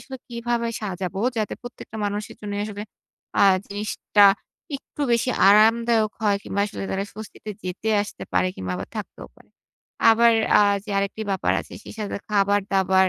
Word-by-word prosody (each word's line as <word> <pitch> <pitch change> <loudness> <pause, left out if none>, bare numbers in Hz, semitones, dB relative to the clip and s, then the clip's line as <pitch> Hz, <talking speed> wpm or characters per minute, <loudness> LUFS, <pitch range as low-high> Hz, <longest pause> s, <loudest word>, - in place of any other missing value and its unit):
আসলে 265 - -8
কিভাবে 235 0 -2
সাজাবো? 190 -2 -4 0.2
যাতে 215 -1 -1
প্রত্যেকটা 245 -2 -9
মানুষের 205 +1 -3
জন্যেই 205 -1 -4
আসলে 205 -1 -6 0.6
আ - - +6 0.2
জিনিসটা 205 0 +2 0.5
একটু 285 +1 -8
বেশি 235 +2 +2 0.2
আরামদায়ক 220 +1 +5
হয় 205 -2 +3
কিংবা 200 - -2
আসলে 210 - -7
তারা 195 +1 -1
স্বস্তিতে 215 0 -8
যেতে-আসতে 205 +3 -2
পারে 185 - +2
কিংবা 90 -1 -4
আবার - - -6
থাকতেও - - -7
পারে। - - -22 0.6
আবার 235 +1 +5 0.3
আ - - +6 0.2
যে 210 - -8
আরেকটি 200 +2 -2
ব্যাপার 190 - +1
আছে। - - -13
সেই - - -10
সাথে 210 -2 -3
খাবার-দাবার 195 -2 +3
210 Hz, 150 wpm, -23 LUFS, 200-220 Hz, 0.6 s, আ